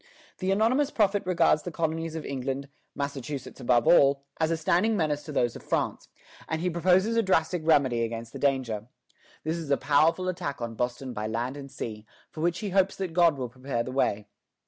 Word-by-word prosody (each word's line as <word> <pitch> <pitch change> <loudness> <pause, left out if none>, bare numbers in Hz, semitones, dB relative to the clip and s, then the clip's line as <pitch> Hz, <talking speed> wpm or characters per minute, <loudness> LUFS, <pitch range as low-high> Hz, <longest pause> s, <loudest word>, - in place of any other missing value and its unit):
The 185 - -1
anonymous 240 +8 +2
prophet 205 -6 +2
regards 170 -4 +3
the - - -5
colonies 165 0 -2
of 160 - -5
England, 135 +1 -3 0.3
Massachusetts 140 -1 -5
above 120 -1 +2
all, 140 -4 +5 0.2
as 160 -1 +2
a 165 - 0
standing 180 +7 +2
menace 150 -4 0
to 155 - -6
those 120 -5 +1
of - - -8
France; - - -2 0.4
and 160 - -1
he 180 +2 -1
proposes 185 +6 +3
a 230 - +4
drastic 180 -4 +1
remedy 140 -7 +3
against 115 0 -5
the - - -7
danger. 125 -6 0 0.6
This 160 +2 -1
is 160 -4 -6
a 140 - +3
powerful 160 +5 +2
attack 170 -6 -3
on 115 -1 -4
Boston 125 +2 -3
by 105 -1 -3
land 120 +4 -2
and 140 -1 -8
sea, 110 -4 -7 0.2
for 155 - -7
which 175 +1 +1
he 205 -3 -3
hopes 195 0 +2
that 190 -4 -4
God 170 -4 +4
will 125 -2 -3
prepare 130 -1 -3
the 130 - -6
way. 105 -6 0
150 Hz, 200 wpm, -27 LUFS, 130-175 Hz, 0.6 s, all